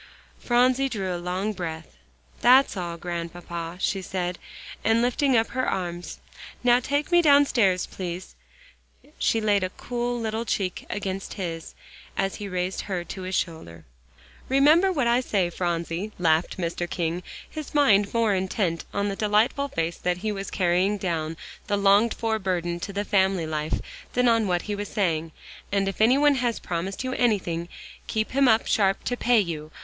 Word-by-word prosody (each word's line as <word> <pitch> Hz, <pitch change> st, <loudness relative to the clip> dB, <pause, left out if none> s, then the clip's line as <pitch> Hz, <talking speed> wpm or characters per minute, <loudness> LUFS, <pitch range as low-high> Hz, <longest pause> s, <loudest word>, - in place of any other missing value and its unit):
Phronsie 255 Hz, +2 st, +3 dB
drew 190 Hz, -6 st, -2 dB
a 175 Hz, -, -5 dB
long 185 Hz, +4 st, -2 dB
breath. 160 Hz, -, -6 dB, 0.5 s
"That's 255 Hz, +2 st, +6 dB
all, 175 Hz, -3 st, -4 dB
Grandpapa," 170 Hz, 0 st, -5 dB
she 195 Hz, 0 st, 0 dB
said, 180 Hz, -1 st, -3 dB, 0.4 s
and 225 Hz, +1 st, +3 dB
lifting 250 Hz, +2 st, +2 dB
up 225 Hz, -, +1 dB
her 255 Hz, +1 st, -1 dB
arms; 175 Hz, -1 st, -4 dB, 0.5 s
"now 245 Hz, 0 st, +5 dB
take 285 Hz, +6 st, -1 dB
me 345 Hz, 0 st, +6 dB
downstairs, 270 Hz, -, +4 dB
please." 180 Hz, 0 st, -6 dB, 0.9 s
She 225 Hz, -, +2 dB
laid 205 Hz, -3 st, +2 dB
a 185 Hz, -, -1 dB
cool 240 Hz, +4 st, -3 dB
little 220 Hz, 0 st, -2 dB
cheek 195 Hz, -5 st, -2 dB
against 195 Hz, -1 st, -4 dB
his, 165 Hz, -4 st, -5 dB, 0.4 s
as 195 Hz, 0 st, -1 dB
he 205 Hz, -, -5 dB
raised 185 Hz, 0 st, -2 dB
her 185 Hz, -4 st, -3 dB
to 190 Hz, +2 st, -7 dB
his 185 Hz, +1 st, -3 dB
shoulder. 85 Hz, -, -4 dB, 0.6 s
"Remember 305 Hz, +8 st, +5 dB
what 285 Hz, -9 st, 0 dB
I 235 Hz, +1 st, +4 dB
say, 195 Hz, -8 st, 0 dB
Phronsie," 170 Hz, +3 st, -2 dB
laughed 165 Hz, 0 st, +1 dB
Mr. 175 Hz, 0 st, -3 dB
King, 170 Hz, 0 st, -2 dB, 0.3 s
his 310 Hz, -1 st, -8 dB
mind 205 Hz, -9 st, +4 dB
more 230 Hz, -3 st, +2 dB
intent 185 Hz, -2 st, -1 dB
on 200 Hz, 0 st, +1 dB
the 200 Hz, -, -2 dB
delightful 215 Hz, +7 st, +2 dB
fact 165 Hz, -8 st, -3 dB
that 180 Hz, -1 st, 0 dB
he 215 Hz, -, +1 dB
was 195 Hz, -1 st, -5 dB
carrying 185 Hz, +2 st, +1 dB
down 165 Hz, -4 st, -2 dB, 0.3 s
the 205 Hz, -, +1 dB
longed 200 Hz, +3 st, +4 dB
for 220 Hz, -1 st, -1 dB
burden 175 Hz, -3 st, -2 dB
to 200 Hz, -, -5 dB
the 200 Hz, +1 st, -2 dB
family 190 Hz, -4 st, +2 dB
life, 155 Hz, 0 st, -2 dB, 0.3 s
than 250 Hz, 0 st, +3 dB
on 230 Hz, -2 st, +3 dB
what 175 Hz, -1 st, 0 dB
he 210 Hz, -, -3 dB
was 205 Hz, 0 st, -4 dB
saying, 165 Hz, -5 st, 0 dB, 0.4 s
"and 195 Hz, -1 st, +1 dB
if 195 Hz, +1 st, -3 dB
any 240 Hz, +5 st, +5 dB
one 290 Hz, 0 st, +5 dB
has 240 Hz, -2 st, 0 dB
promised 180 Hz, +6 st, -4 dB
you 255 Hz, 0 st, -2 dB
anything, 180 Hz, -9 st, 0 dB, 0.4 s
keep 220 Hz, 0 st, -1 dB
him 275 Hz, 0 st, +3 dB
up 225 Hz, -1 st, +4 dB
sharp 195 Hz, -2 st, +2 dB
to 245 Hz, -, -1 dB
pay 245 Hz, -1 st, +3 dB
you. 160 Hz, -6 st, -3 dB
195 Hz, 170 wpm, -25 LUFS, 175-230 Hz, 0.9 s, That's